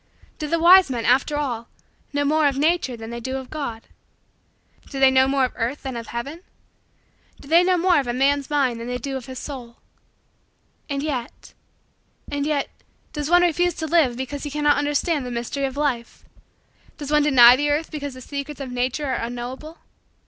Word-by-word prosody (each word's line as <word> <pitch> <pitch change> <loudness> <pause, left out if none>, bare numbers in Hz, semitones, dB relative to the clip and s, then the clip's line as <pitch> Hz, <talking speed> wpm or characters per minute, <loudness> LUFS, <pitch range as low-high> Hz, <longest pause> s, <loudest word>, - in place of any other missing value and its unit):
Do 305 - -3
the 335 - +1
wise 355 0 +7
men, 240 -3 -3
after 265 +4 +2
all, 240 -6 -3 0.4
know 285 0 0
more 305 +1 +3
of 275 -1 -1
nature 300 -4 +1
than 225 0 -8
they 235 - -5
do 260 +3 -4
of 265 -1 -9
God? 255 -7 -5 1.1
Do 275 - -5
they 265 -1 +6
know 260 0 +4
more 270 -1 +2
of 255 - -4
earth 245 +5 -3
than 265 -2 -5
of 230 -1 -6
heaven? 280 +8 -6 1.0
Do - - -14
they 335 +4 +5
know 365 0 +2
more 355 -2 +3
of 270 - -3
a - - 0
man's 275 +2 +1
mind 265 -5 +1
than 230 - -6
they 250 0 -2
do 270 +2 -5
of 260 -1 -6
his 260 -1 -8
soul? 245 -4 -8 1.1
And 280 0 -2
yet 260 -6 -5 0.8
and 285 0 -1
yet 290 -3 -1 0.4
does 295 0 -3
one 355 +1 +5
refuse 350 0 +1
to 320 - -4
live 300 -7 +2
because 265 +2 -5
he 295 - -4
cannot 295 0 +2
understand 290 +1 0
the 250 - -5
mystery 240 +3 -3
of 270 0 -5
life? 255 -6 -2 0.7
Does 290 -2 -6
one 300 0 +4
deny 250 -4 +8
the 290 +3 0
earth 300 +2 -1
because 285 -3 -5
the 255 - -10
secrets 280 +2 -6
of 265 -2 -6
Mature 250 +4 -2
are 255 - -2
unknowable? 245 +7 -6
275 Hz, 200 wpm, -22 LUFS, 250-300 Hz, 1.1 s, deny